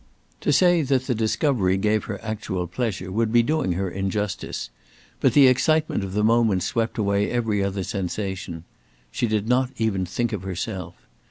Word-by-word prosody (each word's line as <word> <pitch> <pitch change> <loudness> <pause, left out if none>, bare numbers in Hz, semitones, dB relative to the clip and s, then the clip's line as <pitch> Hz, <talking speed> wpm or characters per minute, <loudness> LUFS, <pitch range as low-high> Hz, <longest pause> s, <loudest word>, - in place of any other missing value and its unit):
To - - 0
say 175 +3 +4
that 135 -2 +1
the 130 - 0
discovery 110 -3 +1
gave 105 +2 +1
her 100 -3 -5
actual 105 -5 -3
pleasure 95 -1 -3
would 110 +2 0
be 120 0 +5
doing 150 - 0
her 95 +2 -2
injustice; 95 +2 -3 0.5
but - - +3
the 145 -2 +7
excitement 150 -1 +2
of 95 -1 -5
the 105 +1 +1
moment 110 -4 +3
swept 115 +4 -1
away 100 -1 +1
every 110 -4 0
other 100 0 -2
sensation. 95 -4 -4 0.5
She 120 - -1
did 110 -1 -1
not 125 +1 +2
even 100 -5 0
think 120 +5 -2
of 100 - -3
herself. 95 +1 -5
110 Hz, 170 wpm, -24 LUFS, 95-120 Hz, 0.5 s, the